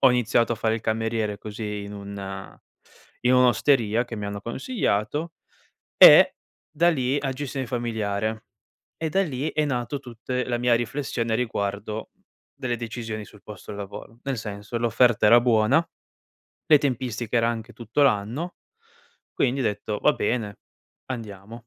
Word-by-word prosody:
Ho 135 - +7
iniziato 120 -1 +2
a - - 0
fare 110 0 0
il 115 - -3
cameriere, 110 -2 -1
così 105 -1 -5
in 100 - -8
un 100 -1 -7 0.6
in 125 +1 +4
un'osteria 125 -2 +3
che 120 -1 -7
mi 105 - -5
hanno 100 0 -5
consigliato. 135 - -2 0.6
E - - +9 0.4
da 170 +2 +3
lì- 135 -2 0
a 135 -2 -2
gestione 135 -1 -4
familiare- 110 -3 -2 0.5
e 160 - -2
da 190 +5 +2
lì 145 -3 -3
è 155 - +1
nato 125 0 -2
tutte 125 +1 -4
la 120 -1 -1
mia 120 0 +2
riflessione 115 -2 -2
riguardo 105 -2 -3 0.4
delle 130 -4 -3
decisioni 115 -2 -5
sul 105 - -17
posto 105 -3 -10
e 105 - -6
lavoro. 105 +3 -9
Nel 135 -2 -2
senso, 105 +1 -5
l'offerta 120 -1 +3
era 120 +3 +8
buona, 120 +6 +3 0.8
le 155 -2 +7
tempistiche 125 -4 -2
era 115 0 +3
anche 115 -1 -4
tutto 120 +5 -1
l'anno, 135 - +1 0.8
quindi 135 +1 0
ho - - +1
detto: 105 -1 -2
"Va - - +4
bene, 105 -3 -2 0.5
andiamo." 115 -1 -8
115 Hz, 150 wpm, -25 LUFS, 105-130 Hz, 0.8 s, E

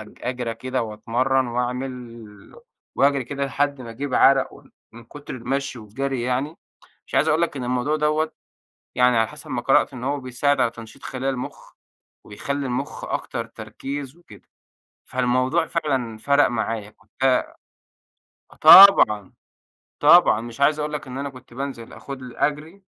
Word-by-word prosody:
أج 105 - -13
أجري 125 -2 -3
كده 130 +2 -3
وأتمرّن 120 +4 0
وأعمِل 120 -3 -6 0.4
وأجري 140 -2 +2
كده 140 +2 -3
لحد 140 -1 -1
ما 115 -2 -8
أجيب 135 +3 -5
عرق 135 -1 +4
وان - - -17 0.2
من 115 0 -13
كُتر 145 +4 -10
المشي 135 +1 -3
والجري 125 +4 -4
يعني. 130 +6 -2 0.5
مش - - -10
عايز - - +3
أقول 160 +3 +2
لك 165 - -1
إن 125 - -4
الموضوع 125 +5 0
دَوَّة 155 +1 0 0.6
يعني 125 -1 +3
على 115 -1 +2
حسب - - -12
ما - - -2
قرأت - - +3
إن 125 -1 -8
هو 140 +1 -1
بيساعد 130 +3 0
على 120 - +2
تنشيط 115 +4 -13
خلايا 135 +1 -3
المُخ، 125 -1 -7 0.5
وبيخلّي 140 +7 -4
المُخ 130 +3 -4
أكتر - - -4
تركيز 140 +1 -7
وكده، 175 - -17 0.6
فالموضوع 130 +7 0
فعلًا 130 -10 -2
فَرَق 140 +5 +3
معايا 110 -2 -3
كنت 105 +6 -9
آه 130 -1 +2 1.1
طبعًا، 110 - +8 0.7
طبعًا 150 -7 +6
مش 120 +3 -9
عايز 150 +2 +3
أقُول 150 0 -3
لك 150 - -5
إن 125 - -7
أنا 140 +1 -4
كنت 130 -2 -15
بانزل 130 -3 -6
آخد 135 -2 -9
لي 125 -1 -10
أجري 155 +6 -2
130 Hz, 155 wpm, -22 LUFS, 120-140 Hz, 1.1 s, طبعًا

